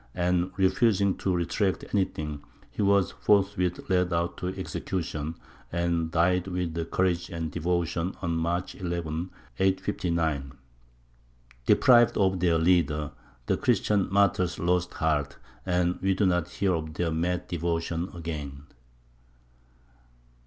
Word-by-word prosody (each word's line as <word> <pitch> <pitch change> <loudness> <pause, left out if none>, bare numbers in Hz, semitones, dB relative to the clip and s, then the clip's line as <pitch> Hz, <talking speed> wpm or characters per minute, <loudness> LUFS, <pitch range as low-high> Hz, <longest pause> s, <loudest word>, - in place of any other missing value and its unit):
And 90 0 +1
refusing 100 0 +3
to 95 - -1
retract 90 +2 0
anything, 75 -7 -1 0.3
he - - -4
was 100 -2 +3
forthwith 100 -3 +1
led 90 -1 +2
out 85 0 0
to 90 - -4
execution, 85 -4 -4 0.4
and 85 -1 0
died 90 +2 +2
with 85 -3 -3
courage 90 -2 0
and 80 -3 -4
devotion 85 +1 -1
on 85 -2 -2
March 85 +2 -1
11, 85 -2 -3 0.3
859. 85 -7 0 1.1
Deprived 120 -3 +5
of 95 -2 +2
their 85 -2 +3
leader, 80 -3 +2 0.3
the - - +1
Christian 100 -3 +1
martyrs 95 -3 +2
lost 90 +1 0
heart, 75 -3 0 0.3
and 90 0 +1
we 95 0 +2
do 100 - +2
not 90 -2 +1
hear 95 +1 0
of 80 -2 -4
their 85 -2 0
mad 90 +2 -1
devotion 85 +1 -2
again. 75 -5 -6
90 Hz, 120 wpm, -27 LUFS, 80-95 Hz, 1.1 s, Deprived